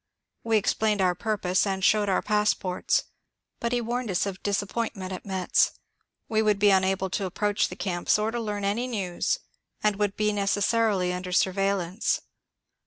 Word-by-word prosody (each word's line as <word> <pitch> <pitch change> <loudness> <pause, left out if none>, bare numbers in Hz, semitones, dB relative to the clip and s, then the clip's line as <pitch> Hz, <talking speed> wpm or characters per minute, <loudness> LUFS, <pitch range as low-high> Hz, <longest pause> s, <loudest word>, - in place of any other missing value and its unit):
We 225 -1 +3
explained 210 0 +1
onr 180 -2 +2
purpose 205 -2 0
and 190 -1 -2
showed 210 -2 +3
our 190 - +1
pass 210 0 +2
ports; 180 -1 0 0.6
but 235 -1 -1
he 245 -1 +1
warned 240 0 -2
us 185 0 +1
of 195 -1 -5
disappointment 200 -1 -2
at 185 - -8
Metz: 190 -2 +2 0.5
we 220 -1 +1
would 210 -2 +2
be 205 0 +5
unable 190 0 +2
to 195 -1 -1
approach 205 +3 0
the - - -7
camps 175 -1 0
or 215 +1 0
to 240 - -2
learn 205 -3 -3
any 225 +5 0
news, 195 -8 -1 0.5
and 210 -2 +2
would 205 -1 0
be 210 0 +1
necessarily 200 -1 +1
under 180 0 -5
surveillance. 190 +1 +1
200 Hz, 170 wpm, -26 LUFS, 190-215 Hz, 0.6 s, be